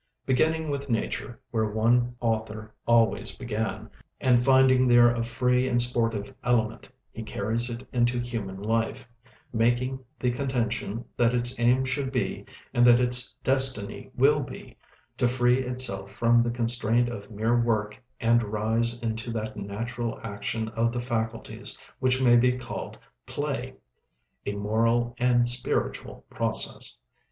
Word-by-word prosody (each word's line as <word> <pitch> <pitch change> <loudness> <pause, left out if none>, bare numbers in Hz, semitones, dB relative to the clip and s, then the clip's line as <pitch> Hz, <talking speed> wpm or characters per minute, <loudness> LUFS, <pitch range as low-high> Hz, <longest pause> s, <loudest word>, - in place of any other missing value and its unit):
Beginning 155 +4 +1
with 140 -1 -4
nature, 120 +2 -3
where 110 -2 0
our 120 +2 +3
author 110 -2 -3
always 115 -1 +2
began, 110 -2 -4 0.3
and 125 -3 +3
finding 130 -1 +4
there 120 -1 +6
a 120 -1 -2
free 125 +2 0
and 120 -1 +1
sportive 115 -4 +1
element, 115 -2 0 0.2
he 115 - -8
carries 110 +2 +1
it 120 +2 -7
into 120 0 +1
human 110 -6 -5
life; 115 +4 -2 0.5
making 120 +3 0 0.2
the 125 - 0
contention 120 -3 -3
that 120 0 +2
its 120 0 0
aim 125 +2 +3
should 130 0 -2
be, 125 -2 -3 0.3
and 120 - +3
that 120 0 +7
its 125 0 +3
destiny 130 -7 +3
will 145 +3 +3
be, 130 - -10 0.4
to 125 - +2
free 125 0 +2
itself 125 -7 -2
from 120 0 +3
the 120 - 0
constraint 120 0 +4
of 110 -4 -7
mere 115 +2 0
work 110 0 -2 0.2
and 115 +1 +3
rise 110 +2 -1
into 115 +1 -3
that 110 -1 -4
natural 115 +4 -5
action 105 +3 -4
of 115 +1 0
the 120 - -3
faculties 115 -2 -2 0.2
which 130 0 +2
may 120 -2 +5
be 125 +1 +4
called 125 - -7 0.3
play - - -4 0.7
a 100 - -1
moral 115 +3 0
and 120 -1 +3
spiritual 120 +1 -1
process. - - -1
120 Hz, 140 wpm, -26 LUFS, 115-125 Hz, 0.7 s, that